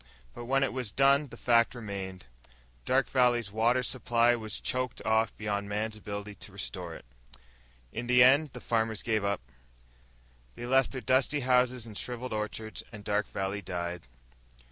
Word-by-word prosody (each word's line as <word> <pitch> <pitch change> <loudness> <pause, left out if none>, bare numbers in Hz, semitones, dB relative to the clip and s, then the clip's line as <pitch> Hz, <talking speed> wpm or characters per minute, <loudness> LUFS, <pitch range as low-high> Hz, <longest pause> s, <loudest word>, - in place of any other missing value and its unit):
But 120 - -8
when 135 +2 +2
it 135 - 0
was 125 -4 -3
done 140 +4 +4
the - - -11
fact 115 0 +3
remained: 100 -5 -6 0.6
Dark 135 +1 +2
Valley's 120 -5 +2
water 120 +4 +2
supply 120 -2 +2
was 110 -3 -4
choked 125 -1 -2
off 110 0 +2
beyond 100 -1 -2
man's 105 +1 -2
ability 105 0 -6
to 100 - -10
restore 90 -3 -5
it. - - -12 0.9
In 120 +1 -4
the 125 0 +7
end 140 +3 +5
the - - -8
farmers 110 -2 0
gave 110 -3 0
up, 100 -1 0 1.2
left 130 +2 +2
their 130 - -5
dusty 135 +4 +2
houses 125 -1 +2
and 110 -2 -10
shriveled 125 +2 -4
orchards, 110 +1 -4
and 105 -3 -10
Dark 105 0 0
Valley 95 +1 -3
died. 85 -4 -5
115 Hz, 160 wpm, -30 LUFS, 105-125 Hz, 1.2 s, the